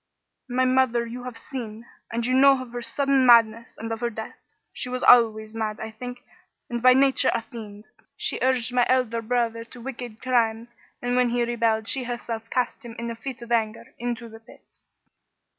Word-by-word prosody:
My 255 +1 +2
mother 255 -2 +2
you 245 +2 -7
have 250 -2 -7
seen, 230 -3 -7 0.3
and 230 0 -2
you 255 - 0
know 270 +1 +6
of 255 -2 -8
her 245 0 -5
sudden 275 +3 +1
madness 230 -2 +4
and 225 +1 -6
of 225 - -3
her 240 0 -1
death. 220 -1 -7 0.4
She 250 - -4
was 255 0 -3
always 220 -2 +5
mad, 220 -1 -3
I 220 - -6
think, 245 +2 -8 0.5
and 240 0 -2
by 255 +1 +7
nature 270 0 +4
a 230 - -2
fiend. 215 -4 -10 0.3
She - - -1
urged 250 -2 +1
my 250 -1 +4
elder 250 -3 +1
brother 230 0 -1
to 245 +2 -14
wicked 240 -2 -7
crimes, 235 -2 0 0.3
and 245 0 0
when 250 -1 +3
he 240 0 +1
rebelled 230 -2 0
she 260 0 +1
herself 230 -2 -5
cast 250 -1 -1
him, 235 -1 -9
in 235 0 -4
a - - -6
fit 240 +1 -7
of 235 - -11
anger, 225 -1 -1
into 240 0 -4
the 225 0 -12
pit. 225 - -19
235 Hz, 195 wpm, -25 LUFS, 225-250 Hz, 0.5 s, by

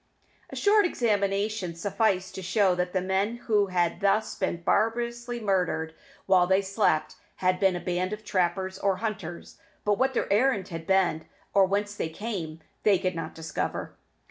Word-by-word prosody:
A - - -8
short 415 0 +4
examination 200 - 0
sufficed 190 0 0
to 190 - -6
show 190 +1 +2
that 180 0 -1
the 185 -1 0
men 195 +4 0
who 210 -3 +3
had 175 -2 0
thus 210 +2 +1
been 170 -3 -3
barbarously 235 +3 0
murdered 180 -6 0 0.3
while 185 -2 +4
they 190 +2 +3
slept 190 -6 0 0.2
had 185 0 +1
been 190 -2 +3
a - - -2
band 180 +1 -2
of 210 0 -6
trappers 190 0 -1
or 195 -1 +1
hunters, 185 -6 -5 0.3
but 205 -1 +2
what 265 0 +1
their - - +1
errand 210 -4 +2
had 165 -1 -7
been, 190 -5 +2 0.3
or 195 -1 +5
whence 205 +1 -1
they 165 - -3
came, 165 -5 -5 0.2
they 205 -3 +4
could 185 +1 -1
not 165 - -6
discover. 155 - -4
190 Hz, 170 wpm, -27 LUFS, 180-210 Hz, 0.3 s, or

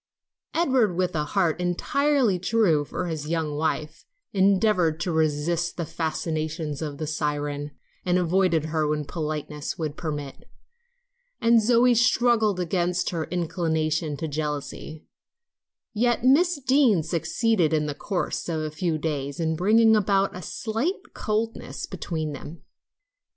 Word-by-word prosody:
Edward, 260 - +2
with 180 -1 0
a 150 -1 0
heart 175 0 0
entirely 240 +4 +1
true 180 -6 +2
to 180 - -4
his 155 -3 -4
young 160 -3 -1
wife, 155 0 -2 0.3
endeavored 190 -4 +3
to 175 - -1
resist 160 +2 0
the 170 - -2
fascinations 155 -1 -3
of 150 -3 -4
the 155 - -3
siren 145 -1 -2 0.3
and 180 0 +2
avoid 180 +1 +2
her 155 -1 0
when 150 0 -1
politeness 150 -1 -4
would 155 -3 -3
permit; 150 -5 -6 0.9
and 230 0 +5
Zoe 240 +2 +4
struggled 235 -4 +3
against 180 0 0
her 165 -3 -2
inclination 160 -3 -1
to 160 - -3
jealousy, 150 +1 -5 0.9
yet 240 +1 +1
Miss 300 +5 +4
Deane 260 - +3
succeeded 170 +2 +1
in 155 -1 +1
the 150 - -2
course 180 +3 -3
of 160 -2 -1
a 155 0 -3
few 160 +1 -1
days 145 -2 -3
in 160 -1 0
bringing 220 +6 +5
about 195 -2 +2
a 180 - -6
slight 230 - -3
coldness 220 +2 -3
between 155 -3 -4
them. 150 +4 -9
170 Hz, 135 wpm, -25 LUFS, 155-210 Hz, 0.9 s, and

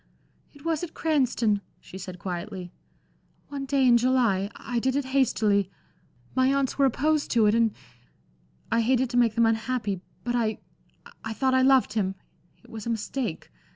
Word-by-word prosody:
"It 285 0 -18
was 325 0 0
at 335 - -6
Cranston," 245 -9 +1 0.2
she 190 - -11
said, 185 -1 -7
quietly, 180 0 -6 0.8
"one 275 -1 -5
day 270 -1 +2
in 240 -1 +6
July. 235 -6 +2
I 245 -2 -3
did 260 +2 0
it 285 -1 0
hastily. 210 -7 +2 0.6
My 260 +1 +3
aunts 275 -1 0
were 275 - +5
opposed 300 +4 0
to 230 -3 +3
it, 210 - +4
and 230 -1 +3 1.0
I 230 +1 +3
hated 255 +1 +1
to 245 - 0
make 230 -3 +3
them 230 -1 +4
unhappy. 225 -3 -1 0.2
But 240 0 -1
I 220 -3 0 0.7
I 220 - -4
thought 260 +3 +1
I 260 - +4
loved 265 -3 +4
him. 195 -3 -1 0.5
It - - -18
was 225 -1 -7
a - - -1
mistake. 225 - -3
235 Hz, 170 wpm, -26 LUFS, 215-265 Hz, 1.0 s, in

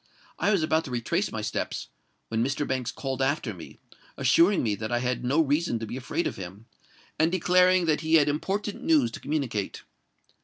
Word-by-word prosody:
I - - +2
was 195 -6 +2
about 160 +1 +2
to - - -7
retrace 120 -2 -1
my - - -4
steps, - - -3 0.4
when 115 0 0
Mr. 135 +3 -1
Banks 130 -2 -2
called 135 -1 -4
after 135 -4 0
me, 85 -3 -11 0.4
assuring 180 +4 +4
me 110 -3 +1
that 110 +3 -4
I 120 - +2
had 125 +1 -1
no 135 +6 +2
reason 150 -3 +1
to 115 - -5
be 110 - -6
afraid 130 +6 -2
of - - -3
him, 95 +3 -9 0.5
and 160 +2 +3
declaring 180 0 +4
that 155 -2 +1
he 160 0 +2
had 150 -2 +5
important 195 +8 -2
news 145 -8 +3
to - - -7
communicate. 135 -9 -3
140 Hz, 195 wpm, -27 LUFS, 120-165 Hz, 0.5 s, had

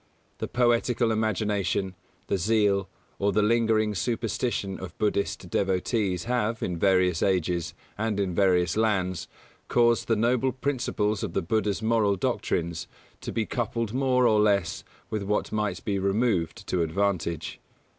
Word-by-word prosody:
The - - -3
poetical 120 -1 +2
imagination, 105 -3 0 0.3
the 100 - -1
zeal, 100 0 +2 0.3
or 100 +1 +2
the 105 +2 +2
lingering 110 -1 +2
superstition 110 -2 -2
of 95 -3 -8
Buddhist 100 -3 -1
devotees 95 -1 0
have, 115 -2 -1
in 90 -2 -2
various 90 -2 +3
ages, 90 -3 0 0.2
and 110 -2 -1
in 95 -3 0
various 90 -2 +2
lands, 95 -6 0 0.4
caused 120 -1 +3
the 115 - +3
noble 120 +3 +1
principles 120 -6 -1
of 105 -7 -4
the - - 0
Buddha's 105 +3 0
moral 110 -3 +2
doctrines 85 -2 -2 0.3
to - - -6
be 115 - -1
coupled 115 -1 -2
more 130 -1 +2
or 110 -3 +4
less 100 -5 +1 0.3
with 110 - -1
what 105 +1 -1
might 105 -1 -2
be 100 -2 0
removed 100 -4 0
to 90 - 0
advantage. 85 -1 -1
105 Hz, 140 wpm, -26 LUFS, 95-115 Hz, 0.4 s, or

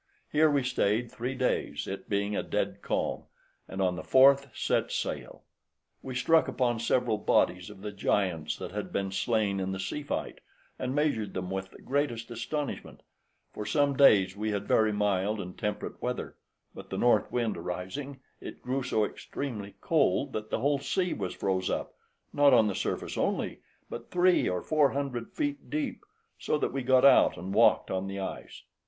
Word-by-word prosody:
Here 155 +1 +4
we 140 -2 +2
stayed 115 -1 0
three 130 +1 -4
days, 100 - -1
it 95 - -6
being 100 0 0
a - - 0
dead - - -2
calm, - - -2 0.4
and 95 - -7
on 90 -1 +1
the - - -5
fourth 135 +1 +5
set - - 0
sail; - - -4 0.6
we 130 -1 -6
struck 160 +6 +4
upon 120 -3 0
several 115 -1 +1
bodies 90 -2 +2
of 100 -2 -12
the 105 - -4
giants 95 -5 0
that - - -6
had - - -5
been 100 -1 -2
slain 100 0 0
in 95 0 -2
the 95 - -4
sea 100 +10 -3
fight, 145 - -4 0.4
and 130 +1 -2
measured 115 -10 0
them 90 0 -3
with 95 0 -3
the - - -16
greatest 130 -5 -1
astonishment: 140 +5 -4 0.5
for 105 - -5
some 145 +4 +1
days 100 -9 +5
we 105 +1 -2
had 100 -1 -2
very 110 -1 +3
mild 105 0 0
and 90 -2 -6
temperate 105 - -4
weather, - - -3 0.4
but - - -11
the - - -4
north 120 - +3
wind 115 -3 0
arising, 95 +11 -5 0.2
it - - -9
grew 130 +2 -1
so 110 -4 +1
extremely 105 -5 -6
cold, 140 - +2
that 110 0 -4
the - - -1
whole 140 +1 +2
sea 180 +5 -1
was - - -4
froze 95 -1 -1
up, - - -3 0.4
not 145 -2 +6
on 115 -2 +5
the 105 - 0
surface - - -3
only, - - -1 0.3
but 120 - -8
three 180 0 +3
or 90 - -2
four 150 -3 +3
hundred 135 -4 -3
feet 290 -2 -3
deep, 300 +3 -3 0.4
so - - 0
that - - -1
we 135 - -1
got 130 +1 +4
out 140 - +6
and 95 +2 -5
walked 115 +3 +4
on 95 +1 -2
the 100 0 -5
ice. 95 - -6
115 Hz, 185 wpm, -29 LUFS, 100-140 Hz, 0.6 s, not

